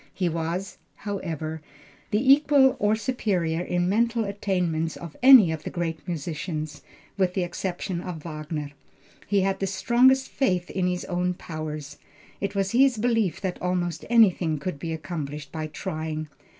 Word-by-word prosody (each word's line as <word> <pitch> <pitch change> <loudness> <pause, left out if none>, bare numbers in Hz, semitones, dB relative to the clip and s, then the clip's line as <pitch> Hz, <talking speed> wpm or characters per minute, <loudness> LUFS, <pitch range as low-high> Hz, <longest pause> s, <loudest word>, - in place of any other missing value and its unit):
He 185 - 0
was, 170 +4 -3 0.2
however, 160 -6 -4 0.5
the 255 +6 +5
equal 280 -2 +4
or 210 +1 +3
superior 195 -9 -1
in 175 0 0
mental 230 +3 +1
attainments 180 -5 -1
of 170 -3 -9
any 250 -9 +9
of 160 -1 -4
the - - -5
great 165 -2 -3
musicians, 155 -2 -4 0.4
with 185 -1 +2
the 190 - +1
exception 175 0 -3
of 175 -4 -6
Wagner. 155 -2 -5 0.6
He 200 -1 +2
had 195 0 0
the 195 - -1
strongest 250 +7 +3
faith 180 -10 0
in 185 -1 0
his 180 0 -2
own 180 0 -1
powers. 155 -4 -6 0.4
It 200 0 -3
was 195 -1 0
his 255 0 +4
belief 225 -5 +1
that 185 -2 -3
almost 175 -2 -1
anything 190 -9 +4
could 145 +1 -4
be 165 +3 -4
accomplished 150 -2 -5
by 155 -1 -4
trying. 155 -2 -4
180 Hz, 150 wpm, -25 LUFS, 160-205 Hz, 0.6 s, any